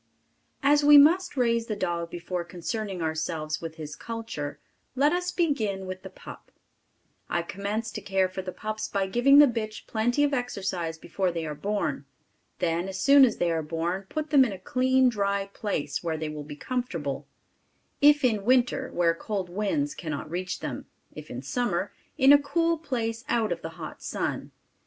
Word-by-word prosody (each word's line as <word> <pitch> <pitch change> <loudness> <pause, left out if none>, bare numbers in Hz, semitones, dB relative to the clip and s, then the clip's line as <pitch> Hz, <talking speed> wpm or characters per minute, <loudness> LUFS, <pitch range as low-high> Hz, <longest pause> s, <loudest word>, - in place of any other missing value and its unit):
As 290 +1 +4
we 295 0 +9
must 320 +3 +5
raise 235 -2 +2
the 215 - -2
dog 175 -4 -2
before 175 +1 -4
concerning 185 +2 -4
ourselves 160 -1 -2
with 165 -1 -6
his 150 -2 -7
culture, 225 -11 -5 0.4
let 285 +4 +3
us 360 0 -1
begin 220 - 0
with 185 0 -6
the - - -9
pup. - - -12 0.8
I 170 - 0
commence 205 +5 -3
to - - -6
care 190 -1 +1
for 185 +1 -5
the 185 0 -6
pups 215 +3 -4
by 195 -1 0
giving 245 +8 +5
the 295 - +10
bitch 220 -4 -3
plenty 240 +6 +1
of 290 -1 +2
exercise 190 -10 -2
before 185 +2 -2
they 165 -1 -3
are 150 - -4
born. 200 +8 -2 0.5
Then 170 +2 -1
as 190 0 -5
soon 275 +7 +7
as 240 - -1
they 175 -1 +1
are 165 -1 0
born, 170 +5 -3
put 310 0 -4
them 280 -3 +7
in 245 - -1
a - - -7
clean, 255 +6 +2
dry 200 -4 0
place, 155 -9 -3
where 165 -2 -1
they 155 0 -3
will 150 -1 -6
be 145 0 -8
comfortable, 170 - -3 0.7
if 295 0 +6
in 215 -5 +1
winter, 255 +2 +2
where 170 -1 +2
cold 190 0 -4
winds 285 - -1
cannot 155 - -5
reach 180 +1 -3
them; - - -5 0.3
if 150 0 -10
in 125 +2 -6
summer, 245 - -1 0.2
in 275 0 +7
a 290 - +6
cool 330 +3 +1
place 230 -6 -3
out 225 -4 +1
of 170 - -2
the 160 - -5
hot 155 -2 -8
sun. - - -3
200 Hz, 185 wpm, -27 LUFS, 170-255 Hz, 0.8 s, the